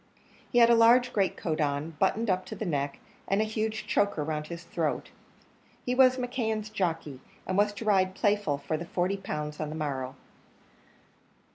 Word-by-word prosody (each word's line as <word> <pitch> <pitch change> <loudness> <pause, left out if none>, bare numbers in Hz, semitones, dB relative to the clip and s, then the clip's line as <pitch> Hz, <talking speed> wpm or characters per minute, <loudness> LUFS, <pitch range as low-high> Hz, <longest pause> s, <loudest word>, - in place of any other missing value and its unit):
He - - +1
had 235 0 +7
a - - +7
large 240 +2 +5
great 195 -3 +1
coat 160 -2 -2
on, 145 +2 -1
buttoned 220 +4 +1
up 185 -2 +1
to 215 - -6
the 215 - -4
neck, 145 -5 -1 0.3
and 195 - +1
a - - +3
huge 215 0 -2
choker 205 -6 +1
round 150 0 -3
his 170 0 -7
throat. 165 -2 -2 0.7
He 250 - 0
was 255 0 +5
McKeon's 225 -4 -2
jockey, 165 -9 -2 0.3
and 185 - -2
was 205 +1 +3
to 210 +2 -7
ride 190 -3 +3
Playful 205 -8 +1
for 140 +3 -3
the 170 - -6
forty 180 +3 -1
pounds 150 -5 -5
on 155 - -3
the 155 - -5
morrow. 135 -4 -3
190 Hz, 180 wpm, -28 LUFS, 155-215 Hz, 0.7 s, had